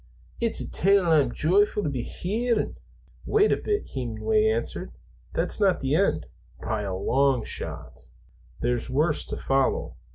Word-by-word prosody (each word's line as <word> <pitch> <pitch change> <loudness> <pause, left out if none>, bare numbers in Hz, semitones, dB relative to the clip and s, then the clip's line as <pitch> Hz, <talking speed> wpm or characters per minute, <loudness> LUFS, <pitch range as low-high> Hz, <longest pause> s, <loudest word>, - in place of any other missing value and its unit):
It's 230 -1 +1
a - - -3
tale 195 0 +3
I'm 145 -6 +4
joyfu' 205 +9 +2
to - - -1
be 130 -4 -2
hearin'." 220 - -1 0.5
"Wait 425 0 +4
a - - +3
bit," 420 0 -2
Hemenway 435 -1 0
answered. 450 +1 -2 0.4
"That's - - -1
not 195 -3 +3
the 135 0 -1
end, 155 - +2 0.3
by 110 -2 -2
a 95 -2 -3
long 130 +4 +2
shot. - - -6 0.5
There's 120 +1 -1
worse 150 +4 +1
to - - -4
follow. 135 0 0
160 Hz, 150 wpm, -26 LUFS, 130-215 Hz, 0.5 s, I'm